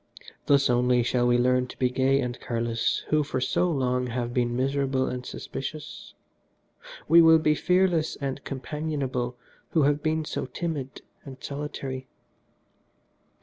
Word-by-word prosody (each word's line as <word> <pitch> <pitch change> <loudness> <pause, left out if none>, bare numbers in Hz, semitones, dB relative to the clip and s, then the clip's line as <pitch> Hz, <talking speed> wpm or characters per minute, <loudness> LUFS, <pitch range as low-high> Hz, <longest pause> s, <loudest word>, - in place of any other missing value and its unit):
Thus 140 -1 +4
only 125 0 +3
shall 120 +1 +1
we 120 0 +4
learn 125 +1 +2
to - - -11
be 125 -1 +1
gay 135 +2 +2
and 125 -1 -4
careless 115 -1 -1
who 155 0 +3
for 140 -3 -2
so 155 +7 +1
long 125 -4 0
have 120 0 -3
been 120 -1 0
miserable 135 0 0
and 125 0 -4
suspicious. 150 +4 -7 0.9
We 170 +2 +8
will 160 0 +7
be 155 -1 +2
fearless 180 -1 +2
and 135 -2 -4
companionable 135 -3 -3 0.4
who 160 - +4
have 145 +1 +2
been 155 0 0
so - - -4
timid 140 -1 -5 0.2
and 135 -2 -10
solitary. 135 -2 -5
135 Hz, 145 wpm, -26 LUFS, 125-150 Hz, 0.9 s, We